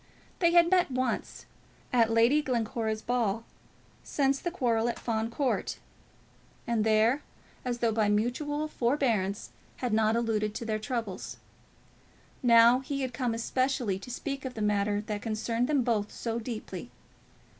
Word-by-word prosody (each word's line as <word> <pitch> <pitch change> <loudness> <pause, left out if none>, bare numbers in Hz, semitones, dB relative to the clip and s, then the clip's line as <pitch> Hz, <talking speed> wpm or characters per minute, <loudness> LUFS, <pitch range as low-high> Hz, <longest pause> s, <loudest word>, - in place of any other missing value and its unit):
They 340 -2 +4
had 345 0 +6
met 360 -3 +4
once, 255 -1 -2 0.5
at 230 -2 +4
Lady 230 +6 +4
Glencora's 225 -4 -2
ball, 230 -3 0 0.6
since 275 -1 +1
the 345 - -2
quarrel 240 -8 +1
at - - -3
Fawn 225 -1 -2
Court, 260 +2 -1 0.9
and 235 -2 +1
there, 220 +5 +3 0.4
as 245 -1 -2
though 235 -1 +1
by 215 -1 +2
mutual 290 +8 0
forbearance, 235 -8 0 0.2
had 245 -4 -2
not 220 0 +3
alluded 215 -2 0
to 230 - -4
their 215 -1 -1
troubles. 225 -4 -4 1.0
Now 235 0 +6
he 275 +1 -4
had 260 -2 -3
come, 245 -2 -1
especially 245 -4 0
to 200 - -10
speak 275 +2 -4
of 260 -2 -5
the 220 - -4
matter 205 0 +1
that 210 -1 -4
concerned 230 +2 -1
them 285 -3 +2
both 215 -4 0
so 230 0 -3
deeply. 230 -1 -6
235 Hz, 145 wpm, -29 LUFS, 220-260 Hz, 1.0 s, had